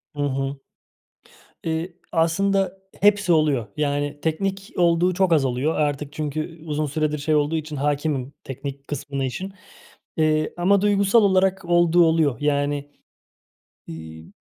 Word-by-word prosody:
Hı 145 - -1
hı. 135 0 -2 1.1
Eee, 165 +2 -2 0.2
aslında 195 +4 +1 0.2
hepsi 205 -2 +4
oluyor. 150 -8 +2
Yani 145 -1 -1
teknik 195 +6 -2
olduğu 175 +1 +3
çok 185 -1 +2
az 145 -4 +4
oluyor. 130 +5 0
Artık 145 -1 -1
çünkü 155 +2 -4
u - - -11
uzun 150 0 -1
süredir 150 +1 -1
şey 155 +2 0
olduğu 150 +2 +2
için 155 -1 -4
hâkimim 145 -1 -1
teknik 140 +1 -7
kısmını 140 -1 -3
işin, 190 +10 -4 0.6
eee, 155 -1 +1
ama 190 +3 +3
duygusal 205 +2 +4
olarak 190 -1 +2
olduğu 175 0 +4
oluyor. 160 -5 +2
Yani, 145 0 0 1.0
iii, 80 0 -10
155 Hz, 135 wpm, -23 LUFS, 145-175 Hz, 1.1 s, hepsi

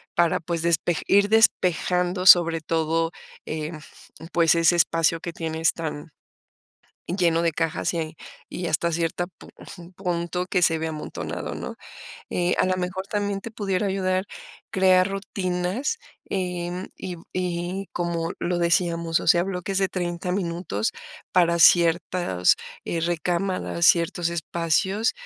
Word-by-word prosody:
para, 170 -1 +3
pues, 170 0 -3
despe 170 0 +1
ir 200 0 +5
despejando 180 -4 +2
sobre 170 -3 +7
todo, 165 +1 0 0.3
eh 155 0 -4 0.6
pues, 165 -1 +4
ese 165 +1 +4
espacio 165 -1 +2
que 170 +1 -6
tienes 165 -1 0
tan 160 -1 -6 1.0
lleno 170 -2 +2
de 170 -1 +1
cajas 165 0 -1
y 160 -1 -4 0.3
y 175 - -5
hasta 170 +2 0
cierta 170 +1 -1
pa 180 - -17 0.5
punto 180 -1 -2
que 180 -1 0
se 165 -1 +4
vea 160 0 -3
amontonado, 155 -1 -5
¿no? - - -6 0.6
Eh, 175 0 +1
a - - +3
la 185 0 +1
mejor 185 +1 -3
también 205 -1 -2
te 230 - -7
pudiera 200 -2 -1
ayudar 190 -1 0 0.5
crear 185 -1 +4
rutinas, 195 - -2 0.3
eh, 180 -2 -2
mm, 180 +1 -5
y 180 -1 -6 0.2
y 180 +1 -3
como 170 -1 -2
lo 175 0 -1
decíamos, 170 -1 +1
o - - -7
sea, 175 - +5
bloques 190 0 -3
de 195 -1 +2
30 175 -1 -3
minutos 170 - -2 0.4
para 170 -1 +3
ciertas, 170 - +4 0.3
eh, 165 - -2
recámaras, 175 +1 0
ciertos 170 0 +3
espacios, 170 +5 0
175 Hz, 135 wpm, -24 LUFS, 165-185 Hz, 1.0 s, sobre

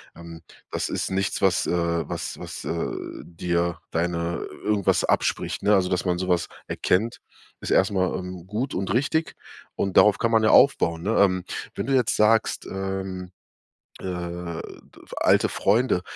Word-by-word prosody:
Ähm, 85 -1 -10 0.3
das - - -2
ist - - -2
nichts, 95 +1 -1
was 95 -2 +3
äh, 85 -2 0
was - - -5
was, - - -7
äh, 85 - -2 0.3
dir 85 -1 -2
deine 85 0 -1 0.3
irgendwas 105 -2 +2
abspricht, - - 0
ne? 105 +1 +4
Also, 95 -2 +2
dass 90 +1 -1
man 90 -1 +1
sowas 90 -1 0 0.2
erkennt, 110 +6 0 0.4
ist - - -5
erstmal, 95 -2 +2
ähm, 90 -1 -7
gut 115 +7 -3
und 95 +1 -2
richtig. 160 +5 0 0.4
Und 95 - -2
darauf 105 -1 +6
kann 115 - 0
man 110 -1 +4
ja 110 - +4
aufbauen, 85 -13 +4
ne? 110 +3 0
Ähm, 95 -2 +3 0.3
wenn - - -3
du 135 - 0
jetzt 125 -4 +2
sagst, 110 +1 +2
ähm, 95 -1 -4 0.7
äh, - - -13
d 85 -2 -6 0.2
alte - - +4
Freunde, 110 -2 +2
95 Hz, 155 wpm, -24 LUFS, 85-105 Hz, 0.7 s, darauf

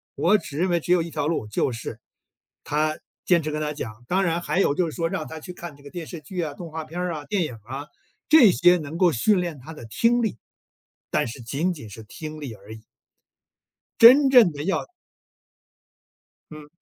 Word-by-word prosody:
我 205 +5 +4
只 145 -7 -8
认 185 +2 +1
为 175 -1 +2
只 170 - -4
有 180 - +3
一 170 - -7
条 150 -2 -2
路， 155 -9 -2
就 105 +5 0
是 115 -1 -7 0.6
他 155 +1 -1 0.3
坚 175 -2 +4
持 155 - -3
跟 150 - -3
他 150 0 -2
讲， 120 -4 -8
当 190 +2 +1
然 170 -2 0
还 175 - -1
有 145 -7 +2
就 175 0 +1
是 - - -9
说 165 -1 -1
让 170 -5 -4
他 160 - -8
去 180 +4 -9
看 175 -4 -9
这 145 - -19
个 140 - -10
电 175 -3 -6
视 170 - -8
剧 180 +4 -5
啊， 150 - -4
动 170 -2 -8
画 160 0 -5
片 170 +3 -7
儿 180 -1 -2
啊， 150 -2 -7
电 200 -1 0
影 125 -7 -5
儿 110 +5 -9
啊， 145 +2 -6 0.4
这 285 - +8
些 175 +1 +5
能 155 0 -6
够 175 -1 +4
训 185 - +2
练 170 -4 -4
他 155 +6 -10
的 135 -7 -10
听 230 - +2
力， 210 - -2 0.7
但 - - +1
是 120 +2 -8
仅 145 +10 -1
仅 130 -10 -10
是 110 +2 -10
听 155 +8 -8
力 135 -6 -6
而 105 +1 -12
已。 110 - -15 1.2
真 270 +4 +9
正 245 -9 +7
的 145 -1 -6
要 190 +3 -1 1.7
嗯。 155 -1 -10
160 Hz, 240 characters per minute, -24 LUFS, 145-180 Hz, 1.7 s, 真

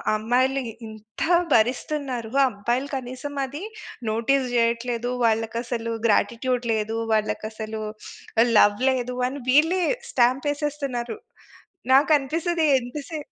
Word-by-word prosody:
అమ్మాయిలు 255 +5 +1
ఈ - - -13
ఇంత 220 0 -12 0.3
భరిస్తున్నారు, 245 0 0 0.2
అబ్బాయిలు 240 +6 -2
కనీసం 260 +2 -6
అది 285 +6 -7 0.5
నోటీస్ 250 +5 +1
జేయట్లేదు. 235 +1 0
వాళ్ళకసలు 230 +1 -1
గ్రాటిట్యూడ్ 245 +3 +1
లేదు. 220 +1 -1 0.2
వాళ్ళకసలు 215 0 -2 0.7
లవ్ 205 0 +5
లేదు 250 -1 -1
అని, 275 +2 -6
వీళ్ళే 325 +7 +4 0.3
స్టాంపేసేస్తున్నారు. 270 -1 0 0.8
నాకనిపిస్తది 310 +4 +3
ఎంత 245 +3 -8
సే 320 - -4
245 Hz, 95 wpm, -24 LUFS, 225-275 Hz, 0.8 s, లవ్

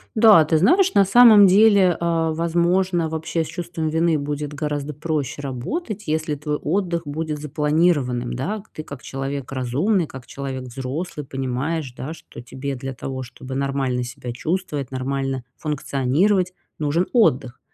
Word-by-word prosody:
Да. 215 -8 +7
Ты 160 0 +2
знаешь, 370 - +4
на 200 - +5
самом 215 -1 +8
деле, 195 -3 +5
а, 165 -1 +1
возможно, 170 +1 +1
вообще 160 +1 -2
с - - -7
чувством 170 -3 -4
вины 160 -1 +2
будет 145 0 -4
гораздо 150 -1 -3
проще 150 -2 -3
работать, 200 - -4
если 155 -1 -1
твой 150 +1 -3
отдых 170 0 -1
будет 155 +1 -3
запланированным, 150 -4 +1
да? 200 - -3
К 220 - -26
ты 155 - -8
как 140 -3 -9
человек 135 0 -5
разумный, 140 - 0
как 130 -2 -10
человек 135 -2 -5
взрослый, 135 +5 -5
понимаешь, 135 +2 -3
да, 150 +5 -5
что - - -12
тебе 135 +3 -5
для 135 +1 -6
того, 130 +1 -5
чтобы 130 +2 -9
нормально 135 -2 -1
себя 120 0 -7
чувствовать, 150 -2 -3
нормально 135 0 -2
функционировать, 155 +6 0 0.2
нужен 155 +4 0
отдых. 130 - +2
150 Hz, 150 wpm, -22 LUFS, 135-175 Hz, 0.2 s, самом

